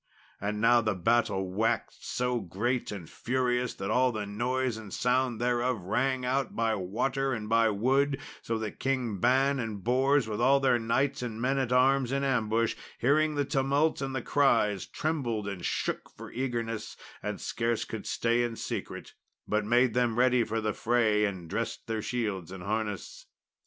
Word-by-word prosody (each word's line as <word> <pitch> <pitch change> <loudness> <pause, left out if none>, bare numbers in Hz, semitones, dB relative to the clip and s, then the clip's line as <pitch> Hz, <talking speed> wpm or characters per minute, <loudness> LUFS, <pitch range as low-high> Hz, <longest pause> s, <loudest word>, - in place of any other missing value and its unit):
And 105 +1 -2
now 120 +2 +5
the 110 -3 0
battle 95 0 +1
waxed 110 +4 -1
so 125 -1 0
great 110 +7 -2
and 95 -6 -7
furious 125 +2 -1
that 95 - -3
all 130 0 +3
the 110 -3 -3
noise 120 +4 -1
and 110 -3 -9
sound 125 0 +1
thereof 120 0 +1
rang 130 +6 0
out 130 0 -1
by 115 -1 +1
water 130 +8 -1
and 110 -3 -4
by 115 0 +4
wood, 135 +6 +1 0.2
so 115 - -2
that 110 -2 -5
Kings 125 -7 -1
Ban 135 +3 +3
and 110 -5 -4
Bors, 130 +1 +3
with 110 +1 -3
all 135 +3 +5
their 130 -3 +3
knights 125 +5 0
and 115 -3 -4
men 135 +3 +1
at 130 -2 -1
arms 130 0 +3
in 140 0 0
ambush, 115 -4 +1 0.2
hearing 150 +4 +2
the 145 -1 +1
tumult 140 +4 +1
and 135 -1 -3
the 130 - -2
cries, 105 -8 +2
trembled 120 -10 -2
and 95 -3 -5
shook - - -2
for - - -11
eagerness, 115 -4 -3 0.2
and - - -4
scarce 115 -1 -1
could 110 - -6
stay 120 +1 +1
in 120 -1 -1
secret, - - -5 0.3
but 105 0 +1
made 120 +1 +3
them 120 -2 +1
ready 125 -1 +4
for 115 0 -2
the 110 -1 -1
fray 110 -3 +2
and 95 -4 -4
dressed 115 +7 -3
their 110 -1 -2
shields 105 -8 -3
and 95 -2 -8
harness. 105 -1 -4
120 Hz, 175 wpm, -29 LUFS, 110-130 Hz, 0.3 s, now